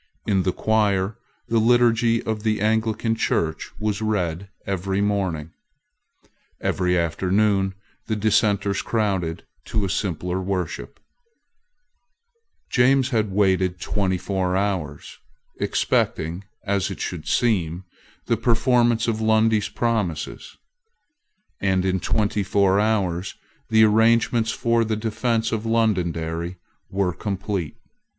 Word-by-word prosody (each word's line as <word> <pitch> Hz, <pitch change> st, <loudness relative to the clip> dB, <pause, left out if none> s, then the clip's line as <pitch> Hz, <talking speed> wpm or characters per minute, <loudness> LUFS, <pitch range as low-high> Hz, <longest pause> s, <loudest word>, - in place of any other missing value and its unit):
In 100 Hz, -3 st, +2 dB
the 95 Hz, -, +1 dB
choir 105 Hz, -1 st, +1 dB, 0.3 s
the 115 Hz, -, +2 dB
liturgy 115 Hz, 0 st, +3 dB
of 110 Hz, -1 st, -3 dB
the 110 Hz, 0 st, 0 dB
Anglican 110 Hz, +1 st, +1 dB
Church 80 Hz, -7 st, -1 dB
was 105 Hz, 0 st, -1 dB
read 95 Hz, -4 st, -1 dB, 0.2 s
every 95 Hz, 0 st, -1 dB
morning. 95 Hz, -7 st, -1 dB, 1.1 s
Every 90 Hz, -1 st, +1 dB
afternoon 95 Hz, +3 st, +1 dB, 0.3 s
the 110 Hz, -, 0 dB
Dissenters 100 Hz, -2 st, +1 dB
crowded 95 Hz, -7 st, -1 dB, 0.2 s
to 105 Hz, -3 st, -1 dB
a 95 Hz, -, -2 dB
simpler 90 Hz, -1 st, -2 dB
worship, 90 Hz, -3 st, -4 dB, 1.7 s
James 130 Hz, +1 st, +3 dB
had 110 Hz, -5 st, 0 dB
waited 95 Hz, -2 st, +2 dB
twenty 95 Hz, 0 st, -1 dB
four 95 Hz, -1 st, -1 dB
hours, 95 Hz, -8 st, -3 dB, 0.4 s
expecting, 85 Hz, +5 st, 0 dB, 0.2 s
as 100 Hz, -2 st, 0 dB
it 95 Hz, -, -7 dB
should 80 Hz, -4 st, -5 dB
seem, 90 Hz, -7 st, +1 dB, 0.4 s
the 115 Hz, -, +1 dB
performance 120 Hz, 0 st, +2 dB
of 110 Hz, -1 st, -1 dB
Lundy's 110 Hz, -1 st, +3 dB
promises; 105 Hz, -10 st, -2 dB, 1.0 s
and 95 Hz, -1 st, +1 dB
in 95 Hz, 0 st, +1 dB
twenty 105 Hz, +2 st, 0 dB
four 100 Hz, 0 st, +2 dB
hours 100 Hz, -4 st, 0 dB, 0.3 s
the 110 Hz, -1 st, +5 dB
arrangements 110 Hz, +1 st, +3 dB
for 115 Hz, 0 st, +1 dB
the 110 Hz, -1 st, -1 dB
defence 115 Hz, +1 st, -1 dB
of 110 Hz, -1 st, -2 dB
Londonderry 90 Hz, -6 st, 0 dB, 0.3 s
were 95 Hz, -2 st, 0 dB
complete. 100 Hz, -4 st, -3 dB
100 Hz, 110 wpm, -23 LUFS, 95-110 Hz, 1.7 s, the